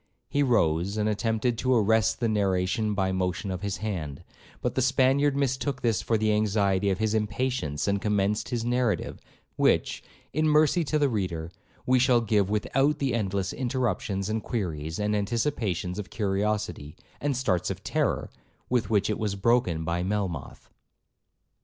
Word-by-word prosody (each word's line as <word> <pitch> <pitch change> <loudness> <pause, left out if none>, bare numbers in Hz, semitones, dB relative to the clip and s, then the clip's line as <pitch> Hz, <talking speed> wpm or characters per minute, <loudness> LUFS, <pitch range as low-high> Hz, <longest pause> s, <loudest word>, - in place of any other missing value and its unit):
He 140 +3 0
rose, 100 - +2
and 105 0 +1
attempted 110 +2 0
to 130 0 +2
arrest 110 -1 +3
the 115 - +1
narration 100 0 0
by 95 -1 +1
a - - -1
motion 95 +1 -2
of 90 -1 -4
his 100 -1 -2
hand; 80 -10 -4 0.4
but - - -2
the 130 - 0
Spaniard 135 +2 +3
mistook 135 0 -1
this 115 -5 +2
for 115 - +1
the 110 0 +2
anxiety 100 -2 +2
of 95 - 0
his 110 0 0
impatience, 105 - -1
and 100 -1 +1
commenced 105 0 0
his 120 -2 -2
narrative, 120 -2 0 0.4
which, - - +2 0.3
in 155 +2 +2
mercy 155 +3 +4
to 155 - +1
the 145 -1 +3
reader, 90 -8 -3 0.3
we 130 0 +4
shall 125 -1 +4
give 105 -4 +1
without 135 +8 +1
the 135 -4 -1
endless 100 -4 -1
interruptions, 120 -6 -1
and 110 +1 -1
queries, 80 - -3
and 105 0 0
anticipations 105 - -1
of 105 - -6
curiosity, 100 -7 -2 0.2
and 140 -3 -1
starts 95 -10 0
of - - -5
terror, - - -1 0.4
with 120 -5 +1
which 105 -3 +2
it 105 - -2
was 105 -2 -1
broken 95 -6 +1
by 85 +2 -1
Melmoth. 95 -6 -3
105 Hz, 165 wpm, -27 LUFS, 95-125 Hz, 0.4 s, mercy